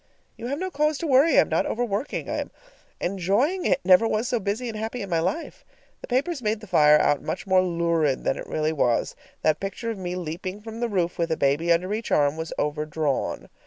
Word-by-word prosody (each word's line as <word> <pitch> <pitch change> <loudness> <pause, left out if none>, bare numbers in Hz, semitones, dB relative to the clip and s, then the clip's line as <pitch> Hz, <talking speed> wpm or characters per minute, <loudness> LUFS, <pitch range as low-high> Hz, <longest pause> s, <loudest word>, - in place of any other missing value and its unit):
You 235 0 -6
have 280 +3 -2
no 375 +3 -3
cause 300 0 +1
to 335 - -4
worry. 285 +2 +4
I - - +9
am - - -2
not - - +1
overworking. 235 +1 -2
I - - -2
am - - -3 0.5
enjoying 200 - 0
it; - - +2
never 185 +4 +6
was 225 +2 0
so 245 -2 0
busy 210 +5 -2
and 225 - -5
happy 220 +2 -4
in 195 - -8
my 165 - +2
life. 185 - -3 0.4
The - - -8
papers 275 +4 0
made 215 -1 0
the 215 - -11
fire 150 -6 +5
out 145 -1 +2
much - - -4
more 190 -1 +4
lurid 170 -5 0
than - - +1
it - - -7
really 155 0 -1
was. 120 -6 +1 0.3
That 155 -1 +2
picture 215 +4 -4
of 215 - -6
me 180 -1 -4
leaping 180 +3 -5
from 225 +1 -9
the 240 0 -1
roof 175 -5 -1
with 165 -1 0
a 160 - +1
baby 145 +5 +1
under 180 +4 +2
each 220 +1 -4
arm 145 0 +3
was 160 0 -5
overdrawn. 150 -1 -2
190 Hz, 230 wpm, -25 LUFS, 160-230 Hz, 0.5 s, I